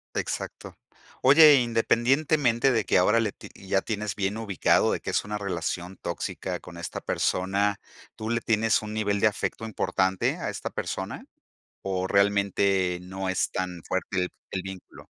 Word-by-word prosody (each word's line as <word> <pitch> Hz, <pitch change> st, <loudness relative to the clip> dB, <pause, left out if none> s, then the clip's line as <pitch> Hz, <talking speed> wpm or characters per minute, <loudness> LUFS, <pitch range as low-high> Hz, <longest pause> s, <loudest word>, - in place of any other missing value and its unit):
Exacto. -, -, -4 dB, 0.5 s
Oye, 150 Hz, +3 st, +8 dB
independientemente 120 Hz, +2 st, +2 dB
de 110 Hz, -3 st, +1 dB
que -, -, +3 dB
ahora 105 Hz, +6 st, +4 dB
le 115 Hz, -, 0 dB
ti -, -, -12 dB
ya 95 Hz, 0 st, -1 dB
tienes 105 Hz, -2 st, -3 dB
bien 100 Hz, +2 st, -1 dB
ubicado, 100 Hz, -5 st, +2 dB
de -, -, -2 dB
que -, -, -4 dB
es -, -, 0 dB
una 105 Hz, 0 st, -4 dB
relación 90 Hz, -1 st, -4 dB
tóxica -, -, -4 dB
con 85 Hz, -1 st, -12 dB
esta 85 Hz, -, -5 dB
persona, 100 Hz, +2 st, 0 dB, 0.4 s
¿tú 110 Hz, 0 st, -5 dB
le 115 Hz, 0 st, +1 dB
tienes 115 Hz, -1 st, +2 dB
un 105 Hz, 0 st, -6 dB
nivel 105 Hz, -2 st, 0 dB
de 110 Hz, -, +5 dB
afecto 110 Hz, +1 st, -4 dB
importante 95 Hz, -3 st, 0 dB
a -, -, -3 dB
esta -, -, -5 dB
persona, -, -, -5 dB, 0.6 s
o 95 Hz, -1 st, -2 dB
realmente 100 Hz, -2 st, +2 dB
no 95 Hz, +1 st, -5 dB
es 95 Hz, -, 0 dB
tan 90 Hz, -2 st, -3 dB
fuerte 95 Hz, 0 st, -1 dB, 0.2 s
el 95 Hz, -, -2 dB
vínculo? 95 Hz, -1 st, -10 dB
100 Hz, 160 wpm, -26 LUFS, 95-110 Hz, 0.6 s, Oye